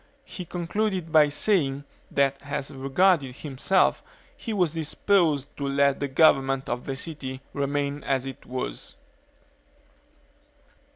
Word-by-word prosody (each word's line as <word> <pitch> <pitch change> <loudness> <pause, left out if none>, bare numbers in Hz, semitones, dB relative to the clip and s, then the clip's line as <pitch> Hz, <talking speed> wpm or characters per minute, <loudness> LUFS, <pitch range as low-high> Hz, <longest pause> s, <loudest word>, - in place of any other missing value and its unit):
He 180 - -8
concluded 180 0 -2
by 155 -2 +6
saying, 145 -4 +1 0.3
that 140 -1 +2
as 140 0 -4
regarded 135 0 +2
himself, 150 +7 +1 0.3
he 230 - -6
was 180 -7 +1
disposed 160 -2 +1
to 140 - -2
let 140 0 +2
the 140 - -1
government 135 -2 +3
of 120 +1 -4
the 135 - -2
city 135 -3 -6
remain 140 0 -2
as 135 -1 0
it 135 -1 -8
was. 125 - -5
140 Hz, 120 wpm, -26 LUFS, 135-165 Hz, 0.3 s, by